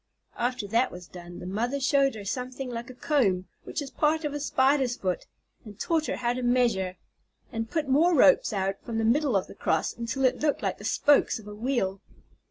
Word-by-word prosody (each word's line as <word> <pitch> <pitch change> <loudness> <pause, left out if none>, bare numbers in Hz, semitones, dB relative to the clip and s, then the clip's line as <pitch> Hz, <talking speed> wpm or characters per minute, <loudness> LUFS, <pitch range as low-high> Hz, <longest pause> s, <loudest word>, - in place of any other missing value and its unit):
After 245 -3 -1
that 230 +5 +1
was 180 0 -9
done, 175 -1 -10
the - - -8
mother 235 +9 -1
showed 275 -1 +2
her 205 -2 -8
something 255 +3 -4
like 235 +1 -6
a 255 - -10
comb, 210 - +1 0.2
which 295 - -3
is 275 - -9
part 310 +1 +1
of 295 - -2
a 290 - -3
Spider's 265 -3 +2
foot, 185 -2 -2 0.4
and 210 -3 -12
taught 320 -2 0
her - - -1
how 240 -1 0
to 255 - -4
measure, 240 -7 +1 0.5
and 225 -1 -3
put 315 -3 -1
more 320 +6 +4
ropes 280 0 +5
out 195 -1 -1
from 230 -2 -5
the 225 - +1
middle 270 +1 +2
of 190 - +2
the - - -12
cross, - - 0
until 235 +3 -1
it 255 - +2
looked 295 -1 0
like - - -1
the - - -9
spokes 290 -1 +3
of 215 -2 -12
a 210 - -7
wheel. 210 -4 -1
245 Hz, 215 wpm, -27 LUFS, 205-275 Hz, 0.5 s, ropes